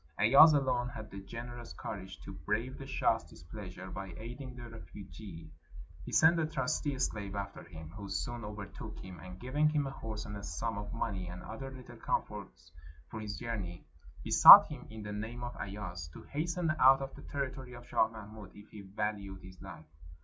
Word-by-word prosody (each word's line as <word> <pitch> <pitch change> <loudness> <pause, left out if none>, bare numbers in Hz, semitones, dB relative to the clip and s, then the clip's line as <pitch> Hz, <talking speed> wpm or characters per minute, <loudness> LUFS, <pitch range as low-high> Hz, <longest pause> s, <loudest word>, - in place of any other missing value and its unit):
Ayaz 140 +9 +8
alone 130 -3 +1
had 110 -2 -8
the 100 - -6
generous 120 +4 -8
courage 95 -3 -7
to 100 - -8
brave 105 +9 -2
the - - -7
shah's - - +2
displeasure 95 +2 -9
by 95 -3 -6
aiding 125 +4 -7
the 120 -1 -8
refugee. 100 -6 -10 0.5
He - - -7
sent 165 +2 +6
a 160 - +1
trusty 145 -1 -1
slave 100 -5 -2
after 100 0 -5
him, 80 -2 -10
who 100 +1 -8
soon 120 +2 -3
overtook 105 +1 -7
him, 95 -3 -9
and 90 +2 -9
giving 145 +5 +2
him 150 -2 +1
a 135 - -3
horse 110 -5 -6
and 105 - -6
a 100 - -6
sum 100 +8 -3
of 105 0 -6
money 95 -5 -2
and 90 +1 -7
other 135 +5 -6
little 125 -2 -11
comforts 60 - -3 0.4
for 110 - -5
his 105 -2 -5
journey, 100 -7 -5 0.4
besought - - +12
him - - -8
in 110 -1 -8
the 105 0 -5
name 115 +4 -5
of 120 0 -5
Ayaz 95 -5 -5
to - - -10
hasten 165 +2 -1
out 135 +1 +7
of 135 - -6
the - - -11
territory 130 -2 -4
of 120 0 -10
Shah 110 - +3
Mahmud 110 -2 -10
if 105 +1 -14
he 105 - -9
valued 100 -1 -4
his 95 -1 -13
life. 95 -4 -10
110 Hz, 190 wpm, -33 LUFS, 95-125 Hz, 0.5 s, besought